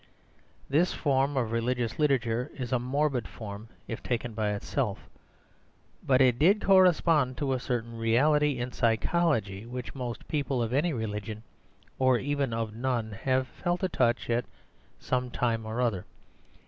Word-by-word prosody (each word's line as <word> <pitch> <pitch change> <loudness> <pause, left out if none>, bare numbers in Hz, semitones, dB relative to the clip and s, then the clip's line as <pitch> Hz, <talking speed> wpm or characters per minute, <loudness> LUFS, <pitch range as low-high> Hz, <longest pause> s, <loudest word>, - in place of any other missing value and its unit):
This 160 +6 +2
form 140 -1 +1
of 115 -4 0
religious 115 +1 -1
literature 130 -3 +1
is 125 -3 -5
a 125 - +2
morbid 130 -2 0
form 105 0 -8 0.2
if 115 - -5
taken 120 -1 -2
by 105 -1 -1
itself; 100 - -3 0.9
but 130 -1 +3
it 125 -2 +4
did 190 +8 +5
correspond 165 -8 +4
to 140 -3 0
a 130 - -1
certain 115 -2 -3
reality 140 +5 +3
in 120 +1 -3
psychology 115 - +1
which 125 0 -6
most 125 -3 -6
people 140 -5 -1
of 115 +1 -3
any 155 +6 +2
religion, 110 -3 -4 0.6
or 130 -1 +4
even 140 0 -1
of 115 -1 -2
none, 120 -2 -1
have 130 +5 0
felt 175 +7 -3
a 185 - +2
touch 120 -6 +1
of 115 - +3
at 120 - -2 0.5
some 125 -1 -1
time 115 -2 -1
or 110 +2 -3
other. 110 -7 0
125 Hz, 155 wpm, -28 LUFS, 115-140 Hz, 0.9 s, did